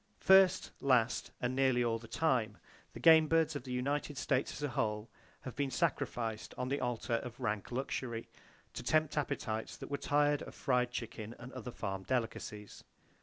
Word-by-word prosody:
First, 190 -1 +5
last 125 -4 +2
and 125 +1 -1
nearly 130 -2 +3
all 115 -1 0
the 115 - -12
time, 120 -8 +1 0.4
the - - -8
game 160 -1 +7
birds 160 -1 +2
of 140 - -5
the 130 - -6
United 140 +3 -1
States 130 0 0
as 145 - -7
a 145 - 0
whole, 110 -2 -2 0.3
have 130 - -7
been 140 -1 0
sacrificed 115 -4 -1
on 125 - -2
the 140 +1 0
altar 120 -1 -1
of 120 +1 -7
Rank 110 -4 -2
Luxury, 120 -2 -3 0.5
to - - -5
tempt 155 +4 +2
appetites 110 -6 -2
that - - -9
were 140 - 0
tired 145 0 +2
of - - -9
fried 125 -2 +1
chicken 115 -2 -6
and 125 +2 -10
other 125 -2 -6
farm 95 -5 -4
delicacies. 110 -2 -3
125 Hz, 175 wpm, -34 LUFS, 115-145 Hz, 0.5 s, game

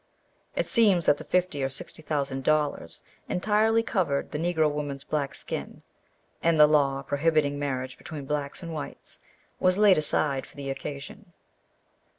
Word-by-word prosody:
"It - - 0
seems 205 -9 +4
that 145 - +4
the - - -7
fifty 180 -6 0
or 135 - 0
sixty 135 +3 -6
thousand 140 -3 -2
dollars 150 - 0 0.3
entirely 215 +4 +2
covered 170 -11 -1
the 150 - -3
Negro 160 -2 +2
woman's 145 -2 -4
black 145 -2 -2
skin, - - -6 0.6
and 165 -1 +2
the 150 - +10
law 140 -2 +2
prohibiting 145 0 +1
marriage 130 -2 -3
between 150 -4 -7
blacks 145 +3 -3
and 165 -1 -6
whites 150 -2 -8 0.4
was 185 0 +3
laid 205 -5 +6
aside 145 -2 +1
for - - -18
the 140 -1 -4
occasion." 145 +8 -8
150 Hz, 155 wpm, -27 LUFS, 140-175 Hz, 0.6 s, the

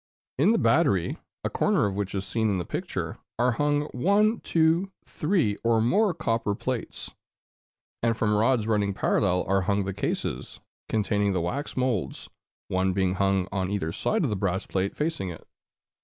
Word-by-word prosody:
In 175 +10 +5
the 230 - +3
battery, 140 - +2 0.2
a - - 0
corner - - +2
of 100 - -1
which 100 0 -3
is 95 0 -2
seen 110 -1 0
in 100 - +1
the 90 - -3
picture, - - -4 0.2
are 125 +2 +3
hung 145 +4 +1
one, 205 - +2
two, 165 +4 +2
three, 150 - 0
or 115 -1 +3
more 195 - +3
copper 115 -8 -1
plates; 125 +1 -4 0.9
and 115 -1 +1
from 105 -1 +1
rods 110 +1 +2
running 105 -3 +1
parallel 90 -2 +1
are 95 0 +2
hung 100 +2 +1
the 95 0 -3
cases 100 - -3 0.3
containing 105 -2 +1
the 90 - 0
wax 135 - -3
moulds, 125 -7 -1 0.4
one 95 0 +1
being 95 -1 +1
hung 95 -1 +1
on 95 -2 -1
either 100 -6 -2
side - - 0
of - - 0
the - - 0
brass 95 0 -1
plate 95 +1 -2
facing 150 - -2
it. 80 - -10
105 Hz, 170 wpm, -26 LUFS, 95-130 Hz, 0.9 s, In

